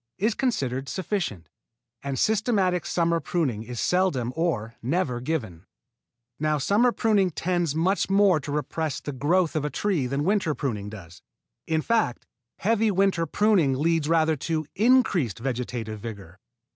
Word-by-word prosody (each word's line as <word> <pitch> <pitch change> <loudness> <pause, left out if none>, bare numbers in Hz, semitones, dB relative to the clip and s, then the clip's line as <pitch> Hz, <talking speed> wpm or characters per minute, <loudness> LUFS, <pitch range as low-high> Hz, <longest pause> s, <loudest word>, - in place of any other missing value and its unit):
is 215 +4 +1
considered 135 - -1
sufficient, 170 - -3 0.5
and 140 -1 -3
systematic 200 - +1
summer 170 -1 +1
pruning 140 -8 -1
is 120 +1 -6
seldom 170 -10 +1
or 130 -10 -1
never 135 -1 -1
given. 110 - -3 0.8
Now 155 0 +1
summer 210 - +3
pruning 210 -5 +2
tends 175 -2 -1
much 185 +6 +1
more 195 -4 +4
to 145 - -6
repress 150 +1 -2
the 145 - -5
growth 160 +6 +1
of 155 - 0
a 150 - -1
tree 165 -3 0
than 140 +3 -1
winter 190 -4 +1
pruning 105 -8 -3
does. 90 -5 -11 0.5
In 160 -1 0
fact, 225 - 0 0.3
heavy 225 +2 +2
winter 190 -4 +1
pruning 195 -6 +3
leads 160 +2 +1
rather 160 -1 +3
to 155 +3 -2
increased 205 - +3
vegetative 120 -3 -4
vigor. 100 -4 -9
160 Hz, 145 wpm, -25 LUFS, 125-190 Hz, 0.8 s, more